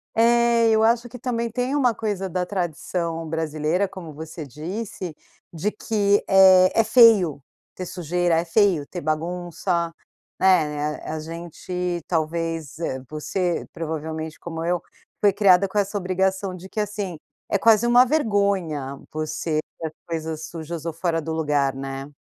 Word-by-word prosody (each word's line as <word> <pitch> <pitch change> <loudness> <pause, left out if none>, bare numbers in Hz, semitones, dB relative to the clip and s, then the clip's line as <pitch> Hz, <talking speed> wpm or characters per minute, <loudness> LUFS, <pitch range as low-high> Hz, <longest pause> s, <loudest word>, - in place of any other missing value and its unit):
É, 235 0 +4
e 220 - +4
eu 220 0 +3
acho 235 +1 +3
que 250 - -10
também 235 -1 -2
tem 250 +4 -1
uma 255 -5 +3
coisa 205 -3 -3
da 180 +1 -1
tradição 170 -2 -3
brasileira, 160 +4 0
como 175 -5 -9
você 160 +1 -7
disse, 175 - -6 0.4
de 185 +6 -1
que 205 -2 +1
é 190 -1 +7
é 225 - +6
feio 215 - +6 0.3
ter 185 - -5
sujeira, 175 -1 0
é 165 +1 +1
feio 170 -4 +3
ter 175 - -6
bagunça, 170 +2 -2 0.5
é - - -5
né, 150 -5 +3
a 155 - -4
a - - -4
gente 175 +2 -4
talvez, 165 -1 -2
eh, 130 -6 -2
você 175 +3 -2
provavelmente 160 0 -5
como 165 -1 -5
eu, 175 0 0 0.4
foi 205 - +5
criada 195 -2 +5
com 200 - -5
essa 205 0 +1
obrigação 190 0 -1
de 185 +1 -10
que 215 - -4
assim, 205 -4 -3 0.3
é - - +2
quase 225 +2 +5
uma 245 +1 +6
vergonha 200 - 0
você 155 0 -2 0.2
ter 160 - -3
as 155 - -9
coisas 160 -1 -4
sujas 165 0 -6
ou 165 - -2
fora 165 0 -1
do 160 - -5
lugar, 145 -4 +1
né. 135 +1 -6
175 Hz, 160 wpm, -23 LUFS, 160-200 Hz, 0.5 s, é